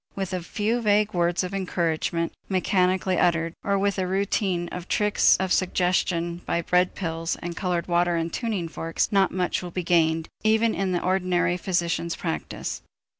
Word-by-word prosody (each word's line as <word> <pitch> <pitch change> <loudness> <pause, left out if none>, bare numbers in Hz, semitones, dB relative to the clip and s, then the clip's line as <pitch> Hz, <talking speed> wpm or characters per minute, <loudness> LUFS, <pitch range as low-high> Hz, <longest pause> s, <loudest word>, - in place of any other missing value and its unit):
With 195 -1 -3
a 180 - -2
few 215 +7 -1
vague 210 -1 +2
words 175 0 +1
of 180 +1 -5
encouragement 170 -3 -1 0.2
mechanically 185 -1 +1
uttered, 170 -1 +2
or 200 0 +1
with 200 0 0
a 185 - 0
routine 190 -2 0
of 180 0 -7
tricks 210 0 +3
of 190 -1 0
suggestion 180 -2 0
by 170 - 0
bread 180 +1 +2
pills 165 -2 -2
and 175 0 -6
colored 180 -2 -1
water 175 0 +2
and 165 0 -2
tuning 215 -8 -2
forks, 165 +1 -2
not 195 -2 +4
much 180 -1 -1
will 180 - -6
be 180 +1 -3
gained 160 -1 +2 0.2
even 220 +1 +3
in 195 -1 -1
the 175 - -1
ordinary 180 -1 +1
physician's 170 -2 -1
practice. 165 -2 -4
180 Hz, 170 wpm, -25 LUFS, 170-195 Hz, 0.2 s, not